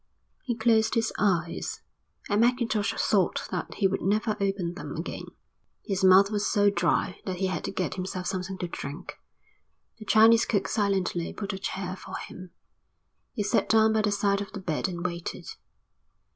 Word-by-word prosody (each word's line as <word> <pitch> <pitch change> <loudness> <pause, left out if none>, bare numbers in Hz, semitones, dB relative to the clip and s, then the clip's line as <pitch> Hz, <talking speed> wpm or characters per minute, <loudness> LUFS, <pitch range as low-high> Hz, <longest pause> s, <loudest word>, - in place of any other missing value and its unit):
He 245 -5 -2
closed 220 -1 +2
his 225 -1 +1
eyes, 175 -5 -1 0.4
and 205 +1 +2
Mackintosh 235 -4 +1
thought 195 -4 +1
that 180 -3 -4
he 200 - +3
would 195 - -2
never 215 +3 +1
open 195 -3 -1
them 185 - -7
again. - - -5 0.6
His 195 -1 -2
mouth 190 +2 +7
was 210 -1 0
so 205 -1 +3
dry 175 +1 0
that 185 - -1
he 190 +2 -1
had 185 -3 -2
to - - -3
get 185 -2 -2
himself 185 0 -4
something 185 +1 -3
to 180 - -3
drink. 145 -2 -7 0.8
The 215 - -9
Chinese 225 +1 +6
cook 195 -4 0
silently 195 -5 0
put 200 -1 -4
a 190 - -5
chair 190 -1 -4
for - - -9
him. 185 0 -9 0.8
He 215 - -2
sat 205 - +1
down 220 0 +5
by 220 - +2
the 210 -1 +1
side 200 -1 +1
of 200 - -7
the 200 - -5
bed 170 -4 -2
and 175 -1 -5
waited. 170 -1 -4
195 Hz, 175 wpm, -27 LUFS, 185-215 Hz, 0.8 s, mouth